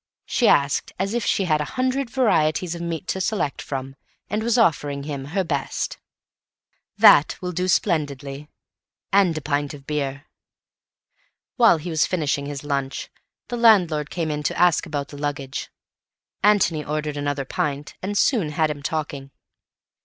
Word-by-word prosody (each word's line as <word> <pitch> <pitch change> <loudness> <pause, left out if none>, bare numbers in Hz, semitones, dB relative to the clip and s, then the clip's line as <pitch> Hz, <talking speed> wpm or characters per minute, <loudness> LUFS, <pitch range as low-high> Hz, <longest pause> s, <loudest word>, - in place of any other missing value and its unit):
she 240 - +1
asked, 140 0 +2
as 195 +3 -1
if 240 -1 0
she 195 - +1
had 155 -3 +2
a 150 - -6
hundred 255 0 0
varieties 175 -9 +1
of 170 - -6
meat 170 0 -4
to 190 - -2
select 185 -8 -1
from, 135 -1 -5 0.4
and 210 +1 0
was 235 +1 +1
offering 145 -9 +2
him 140 -2 -5
her 190 +7 -1
best. 145 -6 -3 1.0
"That 145 - +7
will 180 -1 -4
do 180 +1 -1
splendidly. 145 -6 -1 0.6
And 190 -5 +4
a - - -3
pint 145 0 -1
of 140 -1 -14
beer." 145 -1 -3 1.3
While 230 -8 +6
he 165 +3 -6
was 160 -1 +2
finishing 145 -5 -1
his 145 -1 -6
lunch, 140 -2 -3 0.4
the 240 - -3
landlord 180 -10 +4
came 165 -3 -2
in 150 0 -2
to 150 - -2
ask 175 -2 +3
about 145 -3 -4
the 145 - -10
luggage. 140 -2 -4 0.7
Antony 190 -7 +3
ordered 150 0 -3
another 145 -1 -2
pint, 145 +2 -3
and 205 +2 -2
soon 195 - +2
had 155 -1 +1
him 145 -1 -7
talking. 145 -2 -4
155 Hz, 160 wpm, -23 LUFS, 145-185 Hz, 1.3 s, That